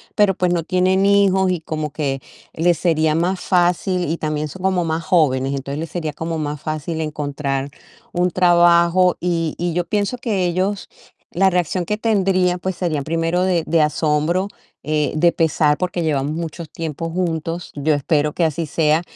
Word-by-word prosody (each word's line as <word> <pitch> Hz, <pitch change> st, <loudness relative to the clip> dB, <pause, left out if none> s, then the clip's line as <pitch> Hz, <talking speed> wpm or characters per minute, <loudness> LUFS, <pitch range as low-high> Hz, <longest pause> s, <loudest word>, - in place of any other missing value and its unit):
pero, 205 Hz, -3 st, +3 dB
pues, 180 Hz, -1 st, +1 dB
no 170 Hz, -, 0 dB
tienen 185 Hz, +3 st, +2 dB
hijos 195 Hz, -2 st, +3 dB
y 175 Hz, -, -1 dB
como 155 Hz, -2 st, -4 dB
que 140 Hz, -3 st, -2 dB, 0.3 s
les 170 Hz, +1 st, +2 dB
sería 160 Hz, -3 st, +2 dB
más 180 Hz, +2 st, 0 dB
fácil, 180 Hz, 0 st, +1 dB
y 165 Hz, -, 0 dB
también 155 Hz, 0 st, -2 dB
son 190 Hz, -, -10 dB
como 185 Hz, -2 st, +1 dB
más 160 Hz, 0 st, -2 dB
jóvenes, 140 Hz, -7 st, +2 dB
entonces 140 Hz, +2 st, -4 dB
les 165 Hz, -1 st, -5 dB
sería 160 Hz, -4 st, -3 dB
como 165 Hz, +2 st, -4 dB
más 150 Hz, -1 st, -4 dB
fácil 155 Hz, +1 st, -3 dB
encontrar 145 Hz, -2 st, -3 dB, 0.4 s
un 180 Hz, 0 st, +1 dB
trabajo. 175 Hz, 0 st, +4 dB
Y 165 Hz, -2 st, -1 dB
y 175 Hz, -1 st, -2 dB
yo 175 Hz, -, 0 dB
pienso 210 Hz, +5 st, -1 dB
que 205 Hz, -7 st, -1 dB
ellos 185 Hz, +3 st, -1 dB, 0.4 s
la 190 Hz, +2 st, +3 dB
reacción 180 Hz, 0 st, 0 dB
que 210 Hz, +4 st, -1 dB
tendrían, 190 Hz, -5 st, +1 dB
pues, 190 Hz, 0 st, -3 dB
sería 160 Hz, -5 st, -1 dB
primero 165 Hz, +3 st, 0 dB
de 180 Hz, -3 st, +1 dB
de 165 Hz, -1 st, +3 dB
asombro, 155 Hz, +4 st, +1 dB, 0.4 s
eh, 150 Hz, 0 st, 0 dB
de 170 Hz, +2 st, +4 dB
pesar, 155 Hz, -2 st, +2 dB
porque 180 Hz, -1 st, -2 dB
llevamos 145 Hz, -2 st, 0 dB
mucho 165 Hz, 0 st, -5 dB
tiempo 165 Hz, +1 st, -5 dB
juntos. 165 Hz, -1 st, -3 dB
Yo 150 Hz, +2 st, +1 dB
espero 150 Hz, +1 st, 0 dB
que 175 Hz, -, 0 dB
así 160 Hz, +1 st, -1 dB
sea. 155 Hz, +2 st, +2 dB
170 Hz, 175 wpm, -20 LUFS, 155-180 Hz, 0.4 s, trabajo